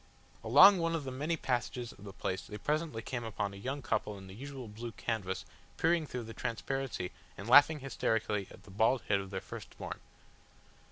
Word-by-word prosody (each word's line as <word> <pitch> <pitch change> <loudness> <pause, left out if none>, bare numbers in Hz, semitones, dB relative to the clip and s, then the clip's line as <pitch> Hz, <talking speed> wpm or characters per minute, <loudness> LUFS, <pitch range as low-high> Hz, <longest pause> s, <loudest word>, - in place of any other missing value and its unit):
Along 180 - +8
one 165 0 +1
of 160 - -2
the 130 - -4
many 150 +6 -1
passages 125 -2 -2
of 100 - -14
the 100 - -7
place 95 0 -3
they 105 - -6
presently 150 -3 -1
came 120 0 -3
upon 105 -3 -3
a - - -9
young 130 +7 -4
couple 105 -3 -1
in 95 - -10
the 95 - -10
usual 135 +2 -7
blue 115 +2 -7
canvas 100 -6 -3 0.3
peering 165 -1 +2
through 125 -3 -4
the 115 0 -8
transparency 120 -4 -3 0.3
and 100 - -7
laughing 145 +4 +7
hysterically 110 -6 0
at - - -14
the 100 - -14
bald 110 +5 +3
head 100 -1 +4
of 95 -1 -6
their 95 -1 -4
first - - -9
born. - - -6
120 Hz, 200 wpm, -33 LUFS, 105-140 Hz, 0.3 s, Along